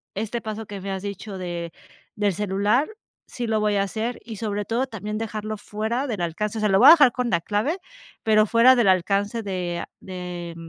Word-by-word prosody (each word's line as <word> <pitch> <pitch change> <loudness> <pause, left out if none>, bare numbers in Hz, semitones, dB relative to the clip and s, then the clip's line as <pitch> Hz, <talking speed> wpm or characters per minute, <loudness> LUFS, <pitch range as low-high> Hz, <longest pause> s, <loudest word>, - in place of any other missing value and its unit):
este 220 +3 -3
paso 220 +1 -5
que 200 -2 -7
me 195 +1 -4
has 190 0 -4
dicho 200 0 -6
de 175 -2 -5 0.5
del 205 -2 +1
celular. 205 - +1 0.4
Sí, 245 - -4
lo 220 -1 +1
voy 210 -1 +1
a 195 - +2
hacer 225 +4 -3
y 225 -3 -7
sobre 210 -1 -2
todo, 245 +5 -1
también 210 -2 -5
dejarlo 215 -1 -4
fuera 220 +6 -3
del 215 -7 -3
alcance, 205 +6 -2
o - - -3
sea, 210 - +2
lo 195 0 +4
voy - - +8
a - - +13
dejar 290 -6 +7
con 250 0 -2
la 170 -5 +1
clave, 215 - -1 0.5
pero 215 -1 +4
fuera 235 +4 +6
del 235 -4 +3
alcance 200 +5 +1
de 180 -3 -3 0.2
de, 180 -2 -7
210 Hz, 210 wpm, -24 LUFS, 195-225 Hz, 0.5 s, a